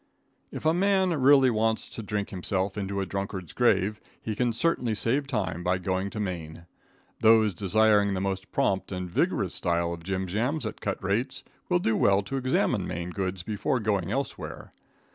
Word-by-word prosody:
If -, -, -7 dB
a 160 Hz, -, +4 dB
man 190 Hz, 0 st, +2 dB
really 135 Hz, -1 st, +6 dB
wants 110 Hz, 0 st, 0 dB
to -, -, -5 dB
drink 105 Hz, 0 st, -3 dB
himself 95 Hz, 0 st, -2 dB
into 100 Hz, -1 st, -2 dB
a -, -, -1 dB
drunkard's 95 Hz, -2 st, -5 dB
grave, 105 Hz, -3 st, +2 dB, 0.2 s
he 110 Hz, -, -4 dB
can 120 Hz, +2 st, +1 dB
certainly 120 Hz, -3 st, 0 dB
save 135 Hz, +6 st, 0 dB
time 95 Hz, -8 st, -2 dB
by 90 Hz, +1 st, +1 dB
going 95 Hz, +2 st, -2 dB
to 105 Hz, -, -6 dB
Maine. 85 Hz, -4 st, -5 dB, 0.5 s
Those 110 Hz, -2 st, +5 dB
desiring 100 Hz, +2 st, +3 dB
the -, -, -1 dB
most 95 Hz, 0 st, -3 dB
prompt 95 Hz, 0 st, 0 dB
and 90 Hz, -1 st, -3 dB
vigorous 85 Hz, -, 0 dB
style 85 Hz, 0 st, 0 dB
of 85 Hz, -, -8 dB
jim 95 Hz, +2 st, -2 dB
jams 120 Hz, -, -1 dB
at 110 Hz, -, -6 dB
cut 100 Hz, -1 st, -3 dB
rates 115 Hz, +8 st, -1 dB, 0.3 s
will 180 Hz, -, +4 dB
do 110 Hz, -11 st, +1 dB
well 100 Hz, 0 st, +3 dB
to 135 Hz, +7 st, -4 dB
examine 130 Hz, 0 st, +1 dB
Maine 85 Hz, +1 st, -4 dB
goods 95 Hz, -1 st, -3 dB
before 110 Hz, +5 st, -1 dB
going 100 Hz, -4 st, 0 dB
elsewhere. 135 Hz, +4 st, -4 dB
100 Hz, 180 wpm, -27 LUFS, 95-115 Hz, 0.5 s, really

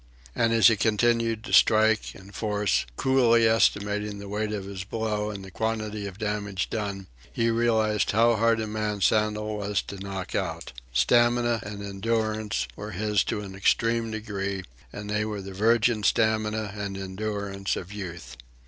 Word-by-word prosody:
And 115 Hz, 0 st, +2 dB
as 115 Hz, -1 st, +4 dB
he 115 Hz, -2 st, +7 dB
continued 115 Hz, +1 st, +1 dB
to 120 Hz, -, -6 dB
strike 110 Hz, 0 st, +4 dB
and 95 Hz, +1 st, -14 dB
force, 105 Hz, -, 0 dB
coolly 120 Hz, -4 st, +4 dB
estimating 105 Hz, -2 st, +1 dB
the 100 Hz, 0 st, -8 dB
weight 105 Hz, +1 st, -2 dB
of 100 Hz, -2 st, -4 dB
his 95 Hz, -1 st, -6 dB
blows 105 Hz, 0 st, -2 dB
and 95 Hz, -1 st, -8 dB
the 95 Hz, -, -11 dB
quality 110 Hz, -1 st, -2 dB
of 95 Hz, -1 st, -9 dB
the 110 Hz, -, -4 dB
damage 100 Hz, -3 st, -2 dB
wrought, 100 Hz, -3 st, -3 dB, 0.3 s
he 115 Hz, 0 st, +1 dB
realized 110 Hz, -2 st, +2 dB
how 115 Hz, +2 st, +4 dB
hard 115 Hz, +1 st, +2 dB
a 110 Hz, -, -1 dB
man 105 Hz, -1 st, -3 dB
Sandel 105 Hz, +1 st, +1 dB
was 100 Hz, 0 st, -1 dB
to 100 Hz, -, -8 dB
knock 95 Hz, -1 st, -5 dB
out. -, -, -3 dB, 0.2 s
Stamina 120 Hz, -, +3 dB
and 100 Hz, 0 st, -7 dB
endurance 110 Hz, +1 st, -1 dB
were 105 Hz, 0 st, -7 dB
his 105 Hz, +1 st, +1 dB
to 105 Hz, -, -2 dB
an 100 Hz, -2 st, -8 dB
extreme 115 Hz, +4 st, +1 dB
degree, 100 Hz, -3 st, -4 dB, 0.3 s
and 105 Hz, 0 st, -7 dB
they 105 Hz, 0 st, 0 dB
were 105 Hz, -1 st, -4 dB
the 95 Hz, 0 st, -8 dB
virgin 115 Hz, +2 st, +3 dB
stamina 110 Hz, -1 st, +1 dB
and 100 Hz, -1 st, -4 dB
endurance 100 Hz, 0 st, -3 dB
of 95 Hz, +3 st, -7 dB
Youth. 85 Hz, -9 st, -7 dB
105 Hz, 165 wpm, -26 LUFS, 100-110 Hz, 0.3 s, he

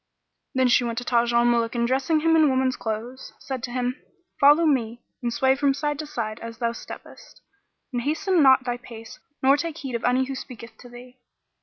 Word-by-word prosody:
Then 260 Hz, -1 st, +3 dB
she 245 Hz, 0 st, +4 dB
went 235 Hz, -1 st, -3 dB
to 245 Hz, -, -2 dB
Taj 240 Hz, -1 st, +1 dB
al 235 Hz, 0 st, +3 dB
Muluk 235 Hz, -1 st, +1 dB
and 235 Hz, 0 st, +1 dB
dressing 270 Hz, +5 st, +1 dB
him 325 Hz, +1 st, +3 dB
in 310 Hz, -2 st, +5 dB
woman's 260 Hz, -1 st, +1 dB
clothes, 230 Hz, +4 st, -6 dB
said 265 Hz, -2 st, -6 dB
to 245 Hz, -, -5 dB
him, 250 Hz, +2 st, -3 dB, 0.4 s
"Follow 295 Hz, +4 st, +6 dB
me 240 Hz, -5 st, 0 dB, 0.2 s
and 240 Hz, -1 st, -2 dB
sway 265 Hz, +2 st, +2 dB
from 275 Hz, 0 st, +1 dB
side 295 Hz, 0 st, -2 dB
to 310 Hz, -, -4 dB
side[FN#44] 230 Hz, -7 st, -5 dB
as 230 Hz, 0 st, -8 dB
thou 235 Hz, -1 st, -1 dB
steppest, -, -, -12 dB, 0.5 s
and 245 Hz, -, -1 dB
hasten 340 Hz, +6 st, +1 dB
not 265 Hz, -2 st, +6 dB
thy 245 Hz, -1 st, -3 dB
pace 230 Hz, -2 st, -12 dB, 0.2 s
nor 270 Hz, +2 st, +5 dB
take 330 Hz, +1 st, -4 dB
heed 270 Hz, -5 st, -6 dB
of 235 Hz, -, -3 dB
any 255 Hz, +1 st, +2 dB
who 270 Hz, -, -5 dB
speaketh 245 Hz, -3 st, -9 dB
to 245 Hz, -, -13 dB
thee." 250 Hz, +1 st, -14 dB
255 Hz, 210 wpm, -24 LUFS, 235-280 Hz, 0.5 s, Follow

